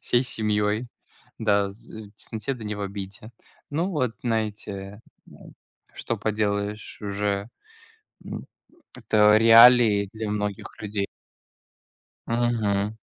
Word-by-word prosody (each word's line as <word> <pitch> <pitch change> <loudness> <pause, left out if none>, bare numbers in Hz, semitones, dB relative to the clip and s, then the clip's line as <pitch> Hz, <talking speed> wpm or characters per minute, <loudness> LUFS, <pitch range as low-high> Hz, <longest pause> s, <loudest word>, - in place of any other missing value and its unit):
всей 120 +1 +2
семьей. 105 0 0 0.5
Да, 100 -2 +2
з 110 +1 -11
в - - -23
тесноте 110 +5 -5
да 115 -3 -10
не 105 0 -3
в 105 - -7
обиде. 100 +2 -7 0.4
Ну 165 +6 -1
вот, 130 - 0
знаете, 105 -3 -3 0.9
что - - -3
поделаешь 105 -1 -2
уже. 100 +1 -2 0.8
М. - - -6 0.5
Это 110 -3 +4
реалии 115 -2 +7
для 110 -1 -4
многих 105 -1 -3
людей. 100 -1 -3 1.2
Мгм. 110 -3 0
105 Hz, 105 wpm, -25 LUFS, 100-115 Hz, 1.2 s, реалии